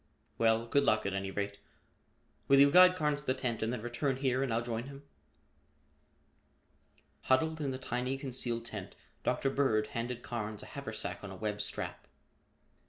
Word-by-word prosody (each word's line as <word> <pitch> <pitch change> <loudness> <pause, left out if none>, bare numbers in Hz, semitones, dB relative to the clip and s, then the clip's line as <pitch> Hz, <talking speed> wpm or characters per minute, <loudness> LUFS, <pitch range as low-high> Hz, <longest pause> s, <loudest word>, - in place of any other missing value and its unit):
"Well, 115 0 +3
good 140 +4 +2
luck 110 -4 +2
at 100 - -1
any 95 0 -2
rate. 100 +1 -3 0.9
Will 135 0 +6
you 140 0 +7
guide 180 +2 +8
Carnes 150 -3 0
to 145 - -18
the 130 - +3
tent 125 -4 -2
and 110 +1 0
then 120 -3 -4
return 120 +3 -1
here 130 -1 0
and 135 -3 0
I'll 115 +1 +1
join 115 0 -3
him?" 140 +1 -10 2.2
Huddled 160 +4 +2
in 140 - -1
the 130 - -3
tiny 130 +1 -2
concealed 120 -3 -1
tent, 105 -5 -7 0.3
Dr. 135 - +1
Bird 120 -7 +2
handed 120 +1 -3
Carnes 110 -2 -4
a - - -9
haversack 110 -8 -5
on 100 - -6
a 95 - -8
web 105 +2 -3
strap. - - -4
120 Hz, 170 wpm, -32 LUFS, 110-135 Hz, 2.2 s, guide